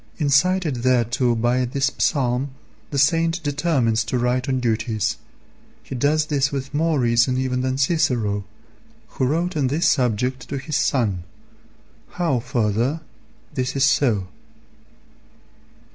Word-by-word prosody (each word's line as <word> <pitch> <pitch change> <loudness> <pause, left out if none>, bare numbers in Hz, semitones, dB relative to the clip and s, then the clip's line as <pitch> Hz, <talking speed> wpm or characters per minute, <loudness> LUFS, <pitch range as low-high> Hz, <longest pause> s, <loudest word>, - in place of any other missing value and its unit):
Incited 155 +1 +2
thereto 120 -1 +2
by 120 +3 +1
this 135 +3 0
psalm 130 -1 +1 0.4
the 140 - -4
saint 165 +4 +2
determines 140 -7 +1
to 125 - -1
write 125 +2 0
on 130 -1 +1
duties. 110 -3 -1 0.7
He - - -8
does 145 +4 +1
this 145 -2 0
with 140 0 -5
more 160 0 +1
reason 120 +1 +2
even 130 -1 -1
than 130 0 -1
Cicero, 125 - +1 0.7
who 130 - -1
wrote 170 +6 -1
on 145 -4 +1
this 150 +6 +1
subject 125 0 0
to 140 - -3
his 145 +3 -4
son. 110 -13 +1 0.9
How, 165 -8 0
further, 120 +4 -1 0.5
this 130 0 -2
is 135 0 +3
so. 120 -8 +2
130 Hz, 130 wpm, -22 LUFS, 120-145 Hz, 0.9 s, is